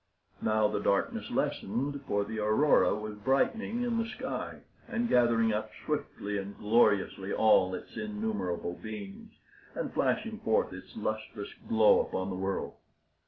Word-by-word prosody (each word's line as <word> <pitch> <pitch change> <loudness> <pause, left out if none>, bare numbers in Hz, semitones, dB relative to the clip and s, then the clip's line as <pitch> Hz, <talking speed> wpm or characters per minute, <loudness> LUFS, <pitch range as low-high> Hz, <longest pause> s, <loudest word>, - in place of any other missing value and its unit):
Now 110 0 +3
the 105 - -1
darkness 100 - 0
lessened, 135 +7 -1
for 100 -4 +1
the 110 +1 -4
aurora 110 +8 +4
was 105 0 -5
brightening 225 - +1
in 235 -2 0
the 230 0 -1
sky, - - -5 0.3
and 235 0 -1
gathering 115 - +4
up 105 +1 -2 0.2
swiftly 100 0 -2
and 100 +1 -7
gloriously 100 -3 +2
all 95 -4 +4
its - - -10
innumerable 210 - -2
beams, 100 0 -8 0.5
and - - -3
flashing - - 0
forth - - +1
its - - -11
lustrous 110 -1 -4 0.2
glow 110 -1 +6
upon 95 +1 -2
the - - -3
world. 95 +1 -3
110 Hz, 140 wpm, -30 LUFS, 100-135 Hz, 0.5 s, glow